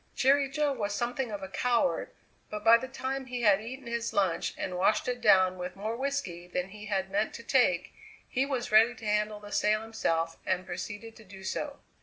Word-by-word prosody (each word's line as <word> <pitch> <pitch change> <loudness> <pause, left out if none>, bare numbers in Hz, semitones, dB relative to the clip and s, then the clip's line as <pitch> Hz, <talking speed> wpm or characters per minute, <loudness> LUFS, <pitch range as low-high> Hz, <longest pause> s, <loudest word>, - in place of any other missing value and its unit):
Jerry 275 +1 +4
Jo 290 +1 +1
was 205 -5 -2
something 245 +2 -2
of 205 -2 -5
a - - -4
coward, 245 +6 +1 0.4
but 210 0 -5
by 225 +1 +8
the 260 +3 0
time 265 0 -4
he 245 -1 -4
had 205 -2 +5
eaten 255 +4 -8
his 235 0 -3
lunch 190 -4 +1
and 185 - -3
washed 195 +6 +2
it 245 -1 -2
down 185 -4 +5
with 180 0 -5
more 215 +3 -3
whisky 245 -10 -3
than 180 +1 -3
he 210 +2 -10
had 190 -2 -1
meant 205 +2 0
to 235 - -8
take, 230 -9 +2 0.3
he 260 - 0
was 265 -5 -2
ready 225 +3 +6
to 225 - -11
handle 210 0 0
the 205 0 -11
sail 215 +1 +2
himself 165 -7 -1
and 185 0 -1
proceeded 205 +6 -6
to 220 - -14
do 190 -1 -12
so. 285 +8 -3
215 Hz, 210 wpm, -29 LUFS, 190-250 Hz, 0.4 s, by